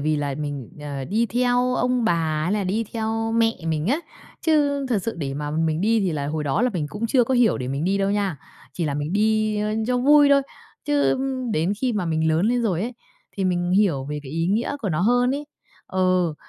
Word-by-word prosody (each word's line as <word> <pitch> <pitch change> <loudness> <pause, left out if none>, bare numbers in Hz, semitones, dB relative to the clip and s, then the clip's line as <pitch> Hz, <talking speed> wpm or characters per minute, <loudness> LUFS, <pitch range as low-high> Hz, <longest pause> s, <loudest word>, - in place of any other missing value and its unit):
vì 155 +2 +1
là 145 -2 -2
mình, 145 -5 -4
ờ, 140 -2 -5
đi 225 - 0
theo 245 +3 +1
ông 250 -1 +1
bà 220 - +3 0.3
hay 180 - 0
là 205 -1 0
đi 210 +5 -1
theo 225 0 -2
mẹ 230 0 +3
mình 160 0 -1
á, 280 +7 +2 0.5
chứ 285 -3 +2
thật 230 -5 +2
sự 230 - -3
để 135 -4 -4
mà 145 0 -4
mình 160 +1 0
đi 225 +2 +2
thì 185 -4 0
là 145 -2 -2
hồi 150 +1 -2
đó 145 - 0
là 250 - +2
mình 165 -7 -2
cũng 210 +10 -3
chưa 245 +1 +3
có 260 - 0
hiểu 240 -8 +3
để 125 0 -4
mình 140 +4 -2
đi 195 +2 +1
đâu 195 0 +1
nha, 200 -6 0 0.4
chỉ 170 - -3
là 145 -2 -1
mình 145 +4 -3
đi 215 0 +1 0.3
cho 250 0 +1
vui 290 +2 +6
thôi. 280 0 +5 0.4
Chứ 290 -2 +2 0.4
đến 170 +4 +1
khi 255 -2 +1
mà 195 -5 -1
mình 160 0 +1
lớn 160 +6 +2
lên 245 0 +1
rồi 190 -4 0
ấy, 240 +1 -4 0.4
thì 195 - -1
mình 175 -1 0
hiểu 180 -9 +2
về 150 +1 -4
cái 135 +1 -9
ý 165 +1 0
nghĩa 225 +8 0
của 205 - -1
nó 160 -2 -1
hơn 245 +6 +3
ấy, 295 +1 -4 0.4
ừ, 185 -3 +1
200 Hz, 235 wpm, -23 LUFS, 155-235 Hz, 0.5 s, vui